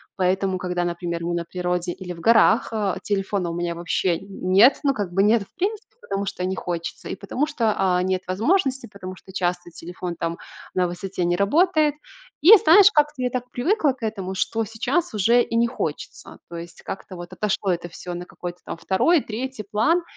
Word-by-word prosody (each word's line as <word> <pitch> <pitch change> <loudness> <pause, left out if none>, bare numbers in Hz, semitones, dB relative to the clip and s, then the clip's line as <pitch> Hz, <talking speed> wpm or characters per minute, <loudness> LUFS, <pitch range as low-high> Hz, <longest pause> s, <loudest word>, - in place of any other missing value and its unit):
поэтому, 190 0 +1
когда, 180 -1 -2
например, 170 -1 -3
мы 175 +1 -1
на 170 - -2
природе 180 0 -2
или 180 0 -7
в 165 - -12
горах, 225 +2 +4
а, 210 -4 -1
телефона 195 -3 -1
у - - -5
меня 175 0 -2
вообще 170 0 0
нет. 195 +5 +3
Ну, 280 -1 +3
как 200 -4 -3
бы 195 - +3
нет 215 +1 +4
в - - -22
принципе, 420 +4 -3
потому 200 0 -3
что 195 -2 -4
не 190 +1 -1
хочется, 170 -2 -5
и - - -3
потому 225 +9 -2
что, 235 -8 0
а, 180 -1 +2
нет 185 0 0
возможности, 265 - +1
потому 185 -2 -8
что 190 - -15
часто 175 -1 -2
телефон 175 +1 -7
там 165 0 -3 0.4
на 180 -1 +1
высоте 180 +1 -4
не 175 0 +2
работает. 305 - +3 0.5
И, 370 +9 +10
знаешь, 370 +3 +7
как-то 300 -2 +2
я 250 - +1
так 250 0 -4
привыкла 310 - +1
к 260 - -22
этому, 195 -4 -3
что 225 +4 -1
сейчас 230 - -1
уже 230 +4 +4
и 230 - -5
не 235 +1 +3
хочется. 155 -9 -6
То 170 - -8
есть 170 0 -9
как-то 190 -1 -7
вот 175 0 -9
отошло 210 -2 -1
это 175 0 -2
всё 175 +1 -7
на 175 +1 -6
какой-то 175 0 -7
там - - -6
2,, 235 - +2
3 240 0 -5
план, 310 +12 +3
195 Hz, 200 wpm, -23 LUFS, 180-240 Hz, 0.5 s, И